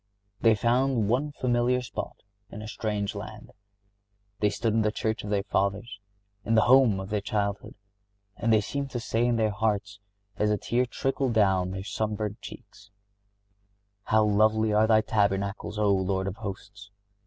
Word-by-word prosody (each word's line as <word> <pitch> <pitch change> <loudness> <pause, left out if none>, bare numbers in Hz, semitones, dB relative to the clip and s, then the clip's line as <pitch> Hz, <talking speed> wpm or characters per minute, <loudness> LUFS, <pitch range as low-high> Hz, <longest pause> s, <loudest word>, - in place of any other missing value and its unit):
They 115 -2 +4
found 120 0 +1
one 140 +6 0
familiar 125 -2 +1
spot - - -7 0.3
in 105 - -8
a - - -7
strange 105 -2 -3
land. 105 +1 -9 0.9
They 105 - +3
stood 115 +1 -1
in 110 - +2
the 105 0 +1
church 110 -1 -2
of 105 - -6
their 100 -1 0
fathers, 100 +3 -2 0.4
in 115 +3 +1
the 110 - +5
home 125 -6 +5
of 95 +1 -7
their 105 -1 0
childhood; 100 -1 -3 0.6
and 115 -1 0
they 110 -1 +5
seemed 140 +6 -4
to 125 - -4
say 115 +1 0
in 120 - +2
their 110 -2 +1
hearts, 105 -1 -2 0.4
as 105 - +1
a 105 - +2
tear 125 +4 0
trickled 135 0 -1
down 95 -4 +2
their 95 0 -5
sun 105 +1 -2
burnt 105 0 -4
cheeks, 100 -1 -12 1.2
"How 110 0 +3
lovely 110 +1 +2
are 110 +1 +4
thy 110 -1 +5
tabernacles, 100 -1 -1
O 105 -1 +3
Lord 95 0 0
of 95 +1 -4
Hosts! 100 -1 -8
105 Hz, 170 wpm, -27 LUFS, 100-115 Hz, 1.2 s, the